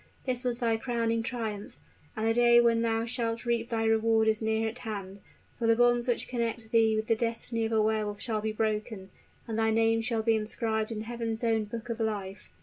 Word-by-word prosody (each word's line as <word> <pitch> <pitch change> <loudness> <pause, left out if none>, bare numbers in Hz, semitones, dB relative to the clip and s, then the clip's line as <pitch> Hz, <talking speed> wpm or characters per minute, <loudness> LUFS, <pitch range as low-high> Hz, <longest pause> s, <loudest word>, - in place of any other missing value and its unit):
This 255 -1 -1
was 245 -2 -1
thy 230 -2 +1
crowning 230 -1 -1
triumph: 225 -4 -5 0.4
and 220 - -1
the 225 - +3
day 240 0 +6
when 230 -1 +3
thou 225 0 0
shalt 230 -1 -2
reap 235 -1 0
thy 225 -1 -1
reward 225 0 +3
is 220 0 +2
near 220 0 0
at 225 +3 -5
hand; 200 -4 -6 0.4
for 230 - 0
the 230 - +5
bonds 240 0 +3
which 240 - 0
connect 230 -2 -3
thee 225 -1 +4
with 215 0 -1
the 225 - +2
destiny 230 0 -2
of 220 - -3
a 220 - +2
Wehr 215 0 +2
Wolf 205 0 -5
shall 220 -3 -2
be 220 0 -1
broken, 215 -2 -3 0.4
and 225 -1 -2
thy 225 0 +2
name 225 0 +2
shall 225 -1 -1
be 225 0 +3
inscribed 220 0 -1
in 215 -1 -4
Heaven's 230 0 -4
own 225 -2 +1
Book 225 +2 -7
of 230 0 -3
Life! 200 -3 -3
225 Hz, 220 wpm, -29 LUFS, 220-235 Hz, 0.4 s, day